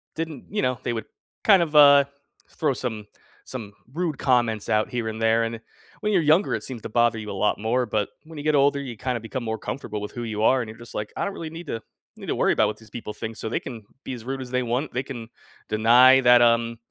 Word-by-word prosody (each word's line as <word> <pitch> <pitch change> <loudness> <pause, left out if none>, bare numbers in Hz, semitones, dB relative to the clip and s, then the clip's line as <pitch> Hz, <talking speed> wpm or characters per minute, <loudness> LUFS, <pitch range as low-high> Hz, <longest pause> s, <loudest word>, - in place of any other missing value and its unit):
didn't, 160 -2 -5
you 210 - -1
know, 125 -2 0
they 120 - -1
would 110 -2 -4 0.4
kind 195 -4 +6
of, 155 -2 -5
uh, 140 -1 +8 0.5
throw 150 -3 0
some 110 -5 -5 0.4
some 110 -6 -8 0.2
rude 165 -3 -2
comments 120 -5 +1
out 110 0 +2
here 120 -2 -3
and 110 0 -5
there, 115 +1 +3
and 115 0 -3 0.4
when 210 0 0
you're 185 - +4
younger, 160 +6 +3
it - - -2
seems 125 -4 -7
to - - -5
bother 120 0 +2
you 105 -1 -6
a - - -4
lot 100 +2 0
more, 120 +4 +1
but 105 -2 -1 0.2
when 160 0 -11
you 145 - -6
get 155 0 +2
older, 140 0 +3
you 130 -4 -6
kinda 125 +2 -2
become 115 +3 -5
more 110 -1 -2
comfortable 105 -1 -5
with 105 - -6
who 120 - -6
you 110 -2 -3
are, 130 +3 +4
and 115 - -6
you're 110 - -10
just 120 0 -12
like, 105 0 -4
"I - - 0
don't 200 - -3
really 165 -4 -6
need 165 +1 -9
to 115 - -4 0.4
need - - -10
to - - -1
worry - - +3
about - - +3
what 105 - -4
these 110 -2 -17
people 110 -2 -6
think 110 +1 -6
so 110 - -4
they - - -1
can 115 -3 -8 0.2
be - - -5
as 120 -3 -8
rude 135 +1 -4
as 125 -1 -8
they 125 0 0
want, 125 +5 -2
they 125 +2 -1
can 120 -5 -8 0.4
deny 120 +5 +6
that, 125 -1 +6
um, 115 0 +3
120 Hz, 265 wpm, -24 LUFS, 110-140 Hz, 0.5 s, uh